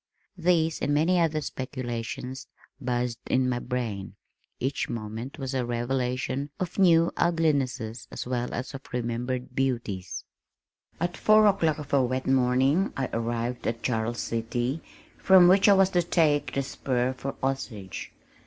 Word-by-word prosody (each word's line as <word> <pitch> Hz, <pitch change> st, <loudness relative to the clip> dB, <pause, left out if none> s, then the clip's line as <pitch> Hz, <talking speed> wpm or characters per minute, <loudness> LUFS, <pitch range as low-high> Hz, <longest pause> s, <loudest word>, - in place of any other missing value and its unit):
These 165 Hz, -2 st, +2 dB
and 145 Hz, -, +1 dB
many 170 Hz, +4 st, +3 dB
other 155 Hz, -2 st, +1 dB
speculations 130 Hz, -2 st, -5 dB, 0.3 s
buzzed 125 Hz, -2 st, -1 dB
in 130 Hz, 0 st, +2 dB
my 125 Hz, -1 st, 0 dB
brain. 110 Hz, -7 st, -4 dB, 0.4 s
Each 135 Hz, +3 st, -1 dB
moment 115 Hz, +4 st, -5 dB
was 135 Hz, -2 st, -4 dB
a 130 Hz, -2 st, 0 dB
revelation 125 Hz, +3 st, -1 dB
of 180 Hz, +1 st, -3 dB
new 170 Hz, -3 st, +5 dB
uglinesses 140 Hz, -9 st, 0 dB
as -, -, -5 dB
well 125 Hz, -1 st, -2 dB
as 125 Hz, +4 st, -4 dB
of 135 Hz, -, -6 dB
remembered 125 Hz, +1 st, -3 dB
beauties. 110 Hz, -, -2 dB, 0.8 s
At 175 Hz, +1 st, -1 dB
four 215 Hz, 0 st, +5 dB
o'clock 180 Hz, -7 st, +3 dB
of 150 Hz, -2 st, -8 dB
a 140 Hz, -, +5 dB
wet 130 Hz, +1 st, -1 dB
morning 130 Hz, +7 st, +3 dB
I 135 Hz, -2 st, -2 dB
arrived 115 Hz, +1 st, -2 dB
at 115 Hz, 0 st, -2 dB
Charles 120 Hz, -1 st, -1 dB
City, 120 Hz, +5 st, -2 dB, 0.4 s
from 185 Hz, -2 st, +7 dB
which 195 Hz, +3 st, +6 dB
I -, -, +8 dB
was 195 Hz, -1 st, +4 dB
to 180 Hz, -, +3 dB
take 155 Hz, -4 st, +2 dB
"the 140 Hz, -, +1 dB
spur" 130 Hz, -2 st, -1 dB
for 135 Hz, +1 st, -5 dB
Osage. 115 Hz, -8 st, -3 dB
130 Hz, 145 wpm, -27 LUFS, 120-155 Hz, 0.8 s, I